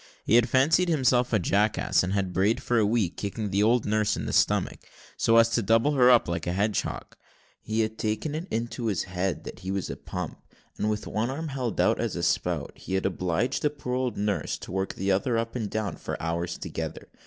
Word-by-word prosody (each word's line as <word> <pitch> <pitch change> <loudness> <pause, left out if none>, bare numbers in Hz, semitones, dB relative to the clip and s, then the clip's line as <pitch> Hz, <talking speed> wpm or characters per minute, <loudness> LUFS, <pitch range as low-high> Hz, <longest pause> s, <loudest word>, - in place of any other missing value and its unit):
He - - +1
had 120 0 +5
fancied 160 +7 +3
himself 130 -5 +2
a 110 - +4
jackass, 105 +3 +2
and 90 - -2
had 95 -2 -1
brayed 100 +4 +2
for 120 -1 +1
a 105 - +3
week, 105 -5 0
kicking 105 0 -3
the 100 +1 +2
old 115 +2 +3
nurse 105 0 +1
in - - -4
the - - -3
stomach, - - +2 0.4
so 115 0 +3
as 115 0 +6
to 115 - +1
double 115 +7 +3
her 130 -4 +5
up 120 -2 +5
like 85 -1 -3
a 85 - 0
hedgehog. 105 +3 -2 0.5
He 110 +1 -1
had 110 0 -3
taken 110 +8 -2
it 160 +4 -4
into 115 +1 -3
his 100 -5 0
head 90 0 -2
that - - -9
he 95 +1 -7
was 95 -1 -2
a - - -5
pump; - - -6 0.4
and 105 - +1
with 105 0 -2
one 110 +3 -1
arm 155 +4 -4
held 130 -5 -3
out - - +3
as - - -2
a - - -3
spout, - - 0
he 95 - -5
had 95 - 0
obliged 90 +4 0
the 150 - +2
poor 140 -4 -6
old 125 -3 -1
nurse 105 0 -1
to - - -10
work 95 +1 -2
the 95 +1 0
other 115 +5 +1
up 115 +1 -2
and 110 -4 -2
down 110 -2 -3
for - - -5
hours 85 +1 -2
together. - - -6
110 Hz, 230 wpm, -27 LUFS, 95-120 Hz, 0.5 s, as